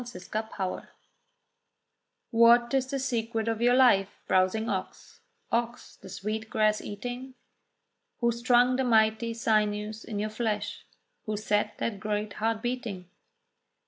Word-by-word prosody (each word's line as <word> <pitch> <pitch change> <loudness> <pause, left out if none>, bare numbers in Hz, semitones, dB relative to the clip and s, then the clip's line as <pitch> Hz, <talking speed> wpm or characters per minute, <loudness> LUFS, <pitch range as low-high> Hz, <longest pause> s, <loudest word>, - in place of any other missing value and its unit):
QUESTIONS 215 -3 -5 1.4
What 235 +1 +5
is 265 -1 +2
the 275 - -1
secret 230 -4 -2
of 225 0 -1
your 245 +1 +4
life, 220 -7 +4
browsing 185 +4 +2
ox, - - -5 0.3
Ox 235 +1 -2
the 190 - -13
sweet 215 +3 -4
grass 215 -1 +2
eating? 245 +5 -6 0.8
Who 235 -1 +2
strung 245 +1 +3
the 265 - +1
mighty 225 -1 +2
sinews 215 -1 0
in 215 - -6
your 210 +1 -2
flesh? 215 -2 -3 0.4
Who 215 -1 -1
set 210 0 0
that 210 -4 -3
great 210 0 -2
heart 225 +1 -1
beating? 230 -8 -4
220 Hz, 125 wpm, -28 LUFS, 210-240 Hz, 1.4 s, What